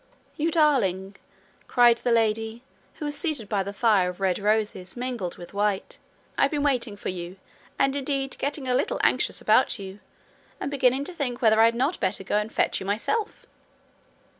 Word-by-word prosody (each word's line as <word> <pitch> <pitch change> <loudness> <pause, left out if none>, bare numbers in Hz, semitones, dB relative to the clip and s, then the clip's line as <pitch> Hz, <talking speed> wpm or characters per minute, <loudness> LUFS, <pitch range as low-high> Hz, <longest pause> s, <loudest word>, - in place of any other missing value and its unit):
'You 315 +2 0
darling!' 205 - +2 0.5
cried 240 -2 +5
the 245 - -1
lady, 225 +1 0 0.3
who 305 - -6
was 295 0 -2
seated 285 -7 -2
by 205 -2 0
a 195 +1 -4
fire 200 -3 +2
of 180 - -8
red 190 -1 +1
roses 210 -2 -1
mingled 240 -8 -4
with 175 - -11
white. 205 -1 -1 0.4
'I've 275 - +4
been 290 -1 -1
waiting 245 -7 0
for - - -4
you, 180 0 -6 0.4
and 275 0 +2
indeed 275 -1 -2
getting 280 -1 -2
a 250 - +1
little 260 +3 0
anxious - - +1
about - - +3
you, 195 0 -9 0.6
and - - -4
beginning 265 -1 +2
to 360 - -6
think 260 -7 -3
whether 220 -3 +4
I - - +8
had 230 0 +3
not 270 +8 0
better 190 +1 -1
go 200 - 0
and 210 +1 -2
fetch - - +1
you 190 - -7
myself.' 410 - -2
230 Hz, 185 wpm, -25 LUFS, 200-275 Hz, 0.6 s, I